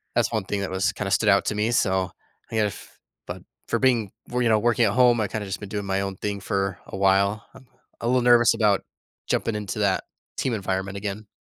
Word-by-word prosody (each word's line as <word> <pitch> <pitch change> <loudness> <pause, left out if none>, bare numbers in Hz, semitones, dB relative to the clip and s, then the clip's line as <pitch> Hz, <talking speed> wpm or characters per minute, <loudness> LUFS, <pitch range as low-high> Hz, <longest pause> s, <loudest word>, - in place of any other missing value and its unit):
that's - - +2
one 110 -4 -1
thing 100 0 -2
that 95 - -3
was 95 +1 +1
kinda - - -4
stood - - +3
out - - +4
to - - -1
me. 105 +3 0
So, 95 -5 +1 0.4
if 105 -3 -3 0.3
but - - -6 0.3
for - - 0
being 120 -6 +2 0.2
well, 125 0 -1
you 120 - +2
know, 110 - +5
working 120 +1 +3
at 100 - +2
home, 120 -2 +4
I 105 - 0
kinda 105 0 -4
just 95 0 -4
been 105 - -7
doing 100 0 -4
my 95 0 0
own 95 -1 -4
thing 100 -1 -3
for 95 -1 -2
a - - -7
while. 100 +2 +2
I'm 130 - -16 0.3
a 115 - -2
little 125 +1 +3
nervous 120 -1 +6
about 105 -3 +2 0.5
jumping 115 - 0
into 105 0 -4
that 100 -2 +1 0.3
team 130 - -1
environment 95 -1 -2
again. 100 +1 -5
105 Hz, 225 wpm, -24 LUFS, 95-115 Hz, 0.5 s, nervous